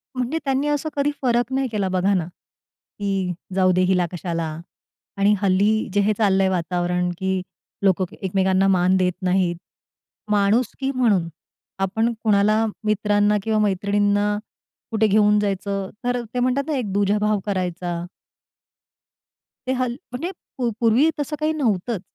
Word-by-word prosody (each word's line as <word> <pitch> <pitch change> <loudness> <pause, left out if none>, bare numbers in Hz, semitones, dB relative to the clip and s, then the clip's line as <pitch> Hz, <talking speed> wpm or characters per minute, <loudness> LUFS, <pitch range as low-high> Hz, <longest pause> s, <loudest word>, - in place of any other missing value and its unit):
म्हणजे 255 +5 -1
त्यांनी 270 +1 0
असं 295 +1 0
कधी 285 0 +1
फरक 245 -1 +1
नाही 265 0 +1
केला 200 -3 -1
बघा 185 +2 +1
ना, 180 -4 0 0.7
की 195 -3 -1 0.2
जाऊदे 185 -1 +3
हिला 180 -2 +2
कशाला 170 -2 -3 0.7
आणि 200 +1 +4
हल्ली 200 +3 +2
जे 205 - +2
हे 210 +2 +2
चाललंय 195 -3 +3
वातावरण 180 0 -1
की 190 0 0 0.4
लोकं 190 -1 +3 0.2
एकमेकांना 190 0 +2
मान 185 0 +3
देत 180 -1 +2
नाहीत. 180 -1 +1 0.8
माणुसकी 220 +6 +1
म्हणून, 210 -9 +2 0.5
आपण 220 +5 +1
कुणाला 215 +1 +3 0.2
मित्रांना 210 0 +2
किंवा 220 0 +1
मैत्रिणींना, 205 +1 +1 0.5
कुठे 220 -1 +2
घेऊन 210 0 +4
जायचं 200 -1 -2 0.2
तर 245 0 0
ते 250 - -1
म्हणतात 255 +3 +1
ना 310 - -1
एक 225 -6 -3
दुजाभाव 205 +1 +1
करायचा. 180 -3 -2 1.6
ते - - +1
हल् 250 -2 -1 0.2
म्हणजे 305 +9 -4 0.5
पूर्वी 240 +7 +4
तसं 295 +1 -2
काही 310 +1 +1
नव्हतंच. 230 - -1
205 Hz, 135 wpm, -22 LUFS, 190-235 Hz, 1.6 s, आणि